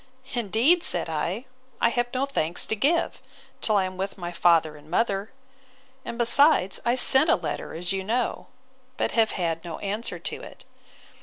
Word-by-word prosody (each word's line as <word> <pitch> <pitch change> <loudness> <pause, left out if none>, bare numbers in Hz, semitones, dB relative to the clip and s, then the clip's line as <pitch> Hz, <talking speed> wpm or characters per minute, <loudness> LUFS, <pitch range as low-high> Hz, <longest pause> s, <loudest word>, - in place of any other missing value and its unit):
Indeed, 240 - +2
said 175 - +3
I, 170 - -3 0.3
I 235 - +3
have 240 0 0
no 260 +1 0
thanks 175 - -1
to 220 - -2
give, 300 +10 0 0.4
till 215 -2 +2
I 195 - +3
am 185 0 -5
with 195 +2 -4
my 175 -2 -5
father 165 -3 +3
and 150 +1 -16
mother: 200 +2 0 0.7
and 235 - -6
besides, 240 - +4
I 240 +1 +2
sent 265 +4 +4
a - - +6
letter, - - -5
as 175 +3 -3
you 190 0 -2
know; 235 +4 -2 0.5
but - - 0
have 225 -1 +2
had 165 -3 -2
no 170 -3 -6
answer 210 +3 -4
to - - -6
it. - - -13
205 Hz, 175 wpm, -25 LUFS, 175-240 Hz, 0.7 s, a